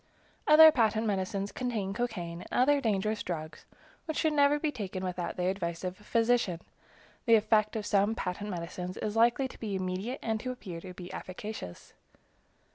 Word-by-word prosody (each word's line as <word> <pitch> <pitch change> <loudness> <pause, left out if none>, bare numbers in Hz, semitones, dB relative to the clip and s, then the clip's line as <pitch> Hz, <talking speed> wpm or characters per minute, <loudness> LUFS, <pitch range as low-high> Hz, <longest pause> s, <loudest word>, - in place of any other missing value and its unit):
Other 315 +1 +10
patent 225 -5 +2
medicines 195 -1 -1
contain 220 -6 -2
cocaine 180 -7 -3
and - - -12
other 280 +3 +3
dangerous 215 -2 0
drugs, 155 -3 -6 0.4
which 315 0 -2
never 295 -2 +4
should 295 - -4
be 305 - +1
taken 190 -7 -5
without 180 0 -3
the 180 - -1
advice 175 -3 -2
of 180 0 -4
a - - -18
physician. 230 -6 +1 0.7
The 230 - +7
effect 215 0 +2
of 215 -2 -3
some 205 +2 +2
patent 200 +1 -4
medicines 180 0 -5
is 210 0 -3
likely 235 +4 +3
to - - -14
be 210 -3 -3
immediate 190 +7 -3
and 220 -1 -1
to 255 +3 -3
appear 180 -9 -7
to 185 0 -9
be 180 +1 -9
efficacious. 185 - -7
210 Hz, 175 wpm, -30 LUFS, 185-235 Hz, 0.7 s, Other